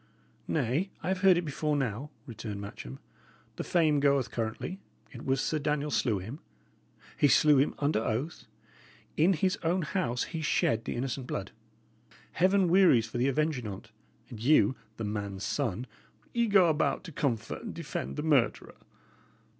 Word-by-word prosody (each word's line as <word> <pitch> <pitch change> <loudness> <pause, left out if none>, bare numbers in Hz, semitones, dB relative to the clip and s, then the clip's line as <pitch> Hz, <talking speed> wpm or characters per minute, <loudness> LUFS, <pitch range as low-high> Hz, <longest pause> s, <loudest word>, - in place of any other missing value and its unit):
"Nay, 150 - 0
I - - -2
have 190 0 0
heard 190 -3 +6
it 175 - -1
before 150 0 -1
now," 135 +1 -2 0.2
returned 110 -3 -6
Matcham. 65 -10 -8 0.6
"The - - -3
fame 155 -4 +2
goeth 140 -3 +2
currently, 115 - -4 0.3
it 120 - -9
was 135 0 +1
Sir 155 +3 0
Daniel 150 0 -1
slew 115 -7 +1
him. 110 - -7 0.8
He 145 - +4
slew 150 +1 +5
him 135 - +2
under 145 -5 +1
oath; 130 +11 -3 0.7
in 170 +5 +4
his 185 +3 +1
own 175 +2 +1
house 150 -8 -1
he 165 -2 -5
shed 115 -6 +1
the - - -3
innocent 130 +1 -3
blood. - - -4 0.8
Heaven 190 +2 +3
wearies 170 - +5
for 115 +2 -5
the 125 - +2
avenging 140 -3 0
on't; 105 +3 -8 0.4
and 115 - -8
you 135 +2 +4 0.2
the 115 - -4
man's 100 -2 -4
son 120 -4 -2 0.5
ye 235 -1 +2
go 195 -4 +5
about 155 -1 +1
to 175 - -9
comfort 135 -8 -2
and - - -6
defend 65 +2 -5
the - - -3
murderer!" 145 -7 +1
140 Hz, 160 wpm, -29 LUFS, 115-160 Hz, 0.8 s, heard